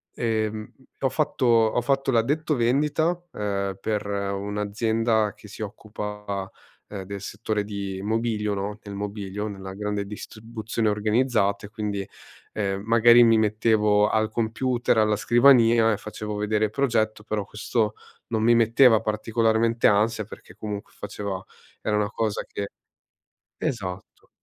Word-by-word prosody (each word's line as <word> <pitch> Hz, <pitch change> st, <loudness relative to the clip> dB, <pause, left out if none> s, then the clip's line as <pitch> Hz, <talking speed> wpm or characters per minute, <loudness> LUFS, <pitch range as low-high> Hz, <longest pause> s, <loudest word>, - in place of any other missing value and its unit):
ehm 110 Hz, -2 st, -2 dB, 0.3 s
ho 135 Hz, -, +1 dB
fatto 130 Hz, -1 st, -1 dB
ho 115 Hz, 0 st, +4 dB
fatto 135 Hz, +1 st, +1 dB
l'addetto 145 Hz, +6 st, +1 dB
vendita, 150 Hz, +8 st, +1 dB
ehm, 100 Hz, -2 st, -2 dB
per 105 Hz, -1 st, -2 dB
un'azienda 105 Hz, +2 st, 0 dB
che -, -, -15 dB
si 105 Hz, -, -10 dB
occupa 105 Hz, -2 st, -5 dB, 0.4 s
del 100 Hz, 0 st, -6 dB
settore 105 Hz, 0 st, -3 dB
di 100 Hz, -2 st, -5 dB
mobilio, 110 Hz, -1 st, 0 dB
no, 100 Hz, +2 st, -3 dB
nel 100 Hz, -1 st, -8 dB
mobilio, 100 Hz, 0 st, -4 dB
nella 95 Hz, -2 st, -7 dB
grande 105 Hz, 0 st, -3 dB
distribuzione 110 Hz, +1 st, -4 dB
organizzata 105 Hz, -1 st, +1 dB
e -, -, -10 dB
quindi, 105 Hz, -3 st, -4 dB, 0.4 s
ehm, 100 Hz, -1 st, -2 dB
magari 120 Hz, +1 st, +7 dB
mi 115 Hz, -1 st, +5 dB
mettevo 105 Hz, -1 st, +3 dB
al 110 Hz, 0 st, +1 dB
computer, 120 Hz, +1 st, 0 dB
alla 105 Hz, 0 st, +3 dB
scrivania 120 Hz, 0 st, +5 dB
e -, -, -2 dB
facevo 105 Hz, 0 st, -6 dB
vedere 105 Hz, +1 st, +1 dB
il -, -, -2 dB
progetto. 110 Hz, -4 st, 0 dB
Però 105 Hz, -2 st, -2 dB
questo 105 Hz, +1 st, -1 dB, 0.3 s
non 110 Hz, -1 st, -1 dB
mi 120 Hz, -, +5 dB
metteva 115 Hz, 0 st, +5 dB
particolarmente 115 Hz, +1 st, +1 dB
ansia 110 Hz, +2 st, +2 dB
perché -, -, -13 dB
comunque 105 Hz, -1 st, -6 dB
faceva 95 Hz, -2 st, -5 dB, 0.4 s
era 105 Hz, -, 0 dB
una 105 Hz, 0 st, 0 dB
cosa 110 Hz, -2 st, -1 dB
che 100 Hz, -, -4 dB, 0.9 s
esatto. 95 Hz, -6 st, -5 dB
110 Hz, 135 wpm, -25 LUFS, 105-115 Hz, 0.9 s, magari